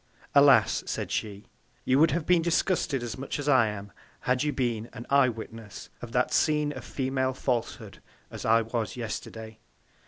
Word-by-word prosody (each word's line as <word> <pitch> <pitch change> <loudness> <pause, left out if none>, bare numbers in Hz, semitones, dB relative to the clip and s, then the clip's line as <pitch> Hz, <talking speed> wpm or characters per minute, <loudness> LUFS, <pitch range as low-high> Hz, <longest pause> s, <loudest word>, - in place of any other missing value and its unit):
Alas! 140 -2 +5
said - - -3
she, 105 -1 -3 0.4
you 130 +2 +3
would 160 - +6
have 170 -2 -1
been 180 -2 +4
disgusted 165 -5 0
as 120 +1 -5
much 135 - -4
as 145 0 -5
I 130 -6 +5
am, 100 -1 -6 0.3
had 125 0 +1
you 150 - +1
been 120 -4 -2
an 120 - -8
Eye 140 -2 +5
witness 115 -2 -9
of 120 - -8
that 125 +1 +1
Scene 150 -1 +2
of - - -8
Female 130 -1 -1
Falshood, 125 -4 -3 0.3
as - - -7
I 115 +1 +4
was 115 +1 -3
Yesterday. 110 -1 -6
125 Hz, 175 wpm, -27 LUFS, 115-140 Hz, 0.4 s, would